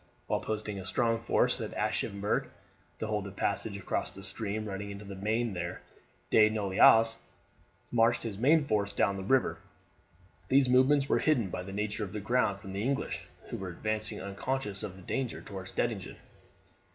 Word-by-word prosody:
While -, -, 0 dB
posting 105 Hz, -2 st, -3 dB
a 95 Hz, -, -7 dB
strong 115 Hz, +3 st, +1 dB
force 115 Hz, -, +2 dB
at -, -, -5 dB
Aschaffenburg 100 Hz, +1 st, 0 dB, 0.5 s
to -, -, -3 dB
hold 105 Hz, -1 st, -1 dB
the 100 Hz, -, -6 dB
passage 100 Hz, +1 st, -1 dB
across 95 Hz, 0 st, -3 dB
a 100 Hz, -, -9 dB
stream 105 Hz, +2 st, -2 dB
running 100 Hz, 0 st, -5 dB
into 100 Hz, +1 st, -8 dB
the 100 Hz, -, -7 dB
Maine 110 Hz, +3 st, -1 dB
there, 85 Hz, -1 st, -4 dB, 0.5 s
De 110 Hz, -1 st, +7 dB
Noailles 110 Hz, +2 st, +5 dB, 0.7 s
marched 115 Hz, 0 st, +3 dB
his 105 Hz, -4 st, -5 dB
main 150 Hz, +5 st, +5 dB
force 100 Hz, -4 st, 0 dB
down 100 Hz, 0 st, +2 dB
the 95 Hz, -, -5 dB
river; 130 Hz, +6 st, +2 dB, 0.9 s
these 135 Hz, 0 st, +4 dB
movements 135 Hz, +3 st, +4 dB
were -, -, +3 dB
hidden 120 Hz, -, +2 dB
by -, -, -3 dB
the 95 Hz, +1 st, -7 dB
nature 105 Hz, +1 st, -2 dB
of 95 Hz, -, -6 dB
the 105 Hz, -, -3 dB
ground 110 Hz, -2 st, +1 dB
from 95 Hz, -1 st, -9 dB
the 100 Hz, -, -2 dB
English, 135 Hz, +4 st, -2 dB, 0.2 s
who -, -, -4 dB
were 95 Hz, -1 st, -5 dB
advancing 110 Hz, +4 st, -3 dB
unconscious 100 Hz, +2 st, -3 dB
of 105 Hz, -4 st, -5 dB
their 95 Hz, -2 st, -13 dB
danger 130 Hz, -4 st, -2 dB
towards 95 Hz, -2 st, -8 dB
Dettingen. 110 Hz, -6 st, -2 dB
105 Hz, 175 wpm, -31 LUFS, 100-115 Hz, 0.9 s, De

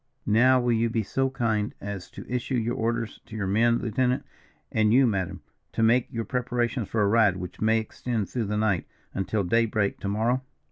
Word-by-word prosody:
"Now 130 Hz, +4 st, +5 dB
will 120 Hz, -1 st, +1 dB
you 115 Hz, +1 st, +2 dB
be 115 Hz, -1 st, 0 dB
so 135 Hz, +6 st, 0 dB
kind 115 Hz, -5 st, -1 dB
as 100 Hz, -2 st, -6 dB
to -, -, -10 dB
issue 125 Hz, +2 st, -2 dB
your 120 Hz, +1 st, 0 dB
orders 115 Hz, -1 st, -2 dB
to 110 Hz, -, -9 dB
your 105 Hz, -3 st, -2 dB
men, 115 Hz, +5 st, +3 dB
lieutenant, 125 Hz, +3 st, 0 dB, 0.5 s
and 110 Hz, -1 st, +3 dB
you, 130 Hz, +3 st, +6 dB
madam, 95 Hz, -6 st, -1 dB, 0.3 s
to 115 Hz, -, 0 dB
make 120 Hz, +2 st, +3 dB
your 115 Hz, -1 st, -3 dB
preparations 120 Hz, -1 st, -1 dB
for 110 Hz, -2 st, 0 dB
a -, -, +3 dB
ride 105 Hz, -3 st, +4 dB
which 90 Hz, -1 st, -8 dB
may 110 Hz, +1 st, +3 dB
extend 110 Hz, -1 st, -3 dB
through 120 Hz, -3 st, -2 dB
the 105 Hz, +1 st, -2 dB
night 105 Hz, -5 st, +1 dB, 0.3 s
until 100 Hz, +2 st, -1 dB
day 115 Hz, +6 st, +2 dB
break 105 Hz, -2 st, -1 dB
to -, -, -4 dB
morrow?" 115 Hz, +5 st, +1 dB
115 Hz, 200 wpm, -26 LUFS, 105-120 Hz, 0.5 s, you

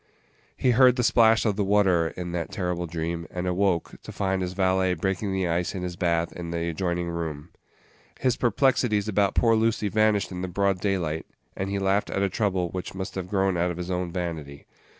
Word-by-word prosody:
He 125 Hz, -, +3 dB
heard 125 Hz, +1 st, +6 dB
the 125 Hz, -, 0 dB
splash 115 Hz, -1 st, +4 dB
of 105 Hz, -3 st, +1 dB
the 105 Hz, -, +1 dB
water 95 Hz, -4 st, +3 dB
in 90 Hz, -1 st, -4 dB
that 85 Hz, -1 st, -3 dB
terrible 90 Hz, -2 st, -2 dB
dream, 85 Hz, +1 st, -4 dB
and 90 Hz, 0 st, -4 dB
awoke, 90 Hz, -1 st, 0 dB
to -, -, -9 dB
find 95 Hz, -1 st, -1 dB
his 90 Hz, 0 st, -3 dB
valet 95 Hz, -1 st, +2 dB
breaking 95 Hz, +4 st, -2 dB
the 95 Hz, -1 st, 0 dB
ice 85 Hz, +2 st, -1 dB
in 90 Hz, -, -4 dB
his 90 Hz, -1 st, -4 dB
bath 85 Hz, -1 st, 0 dB
in 85 Hz, -1 st, -6 dB
the 85 Hz, 0 st, -2 dB
adjoining 85 Hz, +1 st, -2 dB
room. 80 Hz, -2 st, -5 dB, 0.7 s
His 130 Hz, -2 st, +2 dB
perplexities 120 Hz, -3 st, +2 dB
about 100 Hz, -1 st, +1 dB
poor 115 Hz, -1 st, +4 dB
Lucy 110 Hz, -1 st, +1 dB
vanished 110 Hz, -1 st, +2 dB
in 90 Hz, -1 st, -5 dB
the 95 Hz, -, -2 dB
broad 95 Hz, +1 st, 0 dB
daylight, 85 Hz, -6 st, -1 dB, 0.3 s
and 95 Hz, +1 st, -3 dB
he 100 Hz, -, -1 dB
laughed 100 Hz, +1 st, +1 dB
at 100 Hz, -, -1 dB
a 100 Hz, -, +1 dB
trouble 95 Hz, -3 st, 0 dB
which 90 Hz, +1 st, -6 dB
must 95 Hz, 0 st, -5 dB
have 90 Hz, -1 st, -5 dB
grown 95 Hz, -2 st, +1 dB
out 90 Hz, +1 st, +1 dB
of 85 Hz, -, -4 dB
his 90 Hz, +1 st, -4 dB
own 90 Hz, -1 st, -2 dB
vanity. 80 Hz, -6 st, -5 dB
95 Hz, 210 wpm, -26 LUFS, 85-100 Hz, 0.7 s, heard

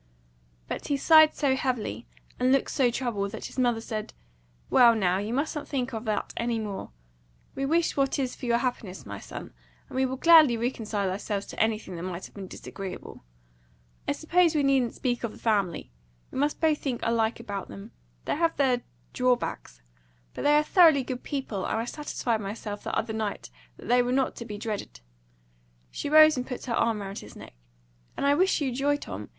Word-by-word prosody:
But -, -, -5 dB
he 285 Hz, -, +1 dB
sighed 315 Hz, +1 st, +6 dB
so 275 Hz, -3 st, +2 dB
heavily, 255 Hz, -, -2 dB, 0.3 s
and 255 Hz, +1 st, +3 dB
looked 275 Hz, 0 st, +2 dB
so 255 Hz, -3 st, +3 dB
troubled, 230 Hz, -5 st, -2 dB
that 220 Hz, -, -6 dB
his -, -, -6 dB
mother 240 Hz, -3 st, +2 dB
said, 215 Hz, -2 st, -5 dB, 0.5 s
"Well, 235 Hz, -2 st, +6 dB
now, 190 Hz, -3 st, +1 dB
you 205 Hz, +2 st, -3 dB
mustn't 295 Hz, +4 st, -2 dB
think 260 Hz, -2 st, -2 dB
of 225 Hz, +1 st, -5 dB
that 215 Hz, -1 st, -2 dB
any 235 Hz, 0 st, -1 dB
more. 210 Hz, -3 st, -5 dB, 0.6 s
We 275 Hz, 0 st, -2 dB
wish 330 Hz, +3 st, +1 dB
what 275 Hz, -1 st, +1 dB
is 260 Hz, -3 st, -2 dB
for 250 Hz, -, -7 dB
your 235 Hz, 0 st, +3 dB
happiness, 235 Hz, -6 st, -4 dB
my 100 Hz, -1 st, -7 dB
son, -, -, -9 dB, 0.3 s
and -, -, -11 dB
we 260 Hz, 0 st, +2 dB
will 260 Hz, +1 st, -4 dB
gladly 310 Hz, -5 st, +7 dB
reconcile 220 Hz, -5 st, -2 dB
ourselves 200 Hz, +1 st, -3 dB
to -, -, -9 dB
anything 215 Hz, -5 st, -1 dB
that -, -, -6 dB
might 180 Hz, 0 st, -5 dB
have -, -, -13 dB
been 195 Hz, -2 st, -8 dB
disagreeable. 190 Hz, -, -8 dB, 0.8 s
I -, -, +2 dB
suppose 335 Hz, 0 st, +2 dB
we 295 Hz, -, +2 dB
needn't 265 Hz, -4 st, +2 dB
speak 245 Hz, -2 st, -2 dB
of 230 Hz, -, -3 dB
the -, -, -13 dB
family. 200 Hz, -, 0 dB, 0.4 s
We -, -, -4 dB
must 290 Hz, +1 st, 0 dB
both 315 Hz, -2 st, +2 dB
think 255 Hz, -4 st, -3 dB
alike 230 Hz, 0 st, +1 dB
about 200 Hz, -5 st, -5 dB
them. 100 Hz, 0 st, -10 dB, 0.3 s
They -, -, -1 dB
have 330 Hz, 0 st, +1 dB
their 255 Hz, -3 st, +2 dB, 0.3 s
drawbacks, 250 Hz, -, -1 dB, 0.5 s
but -, -, -6 dB
they 295 Hz, 0 st, +5 dB
are 300 Hz, -, +4 dB
thoroughly 320 Hz, -5 st, +5 dB
good 250 Hz, 0 st, -5 dB
people, 260 Hz, -9 st, -4 dB
and -, -, -1 dB
I 225 Hz, -, -1 dB
satisfied 240 Hz, -5 st, -2 dB
myself 205 Hz, 0 st, -6 dB
the -, -, -2 dB
other 220 Hz, 0 st, -2 dB
night 215 Hz, -, -4 dB, 0.3 s
that -, -, -11 dB
they 245 Hz, +1 st, +4 dB
were 245 Hz, 0 st, -1 dB
not 265 Hz, 0 st, +1 dB
to 235 Hz, -, -6 dB
be 210 Hz, -2 st, -6 dB
dreaded." 205 Hz, -, -5 dB, 0.9 s
She -, -, -4 dB
rose, 310 Hz, -1 st, +7 dB
and 250 Hz, -, -3 dB
put 250 Hz, -, -6 dB
her 245 Hz, -, -2 dB
arm 230 Hz, -2 st, +1 dB
round 195 Hz, +1 st, -6 dB
his -, -, -12 dB
neck. -, -, -11 dB, 0.6 s
"And -, -, -1 dB
I 280 Hz, -, +5 dB
wish 370 Hz, +2 st, +2 dB
you 270 Hz, -3 st, 0 dB
joy, 280 Hz, +3 st, +1 dB
Tom! -, -, -7 dB
245 Hz, 200 wpm, -27 LUFS, 215-275 Hz, 0.9 s, gladly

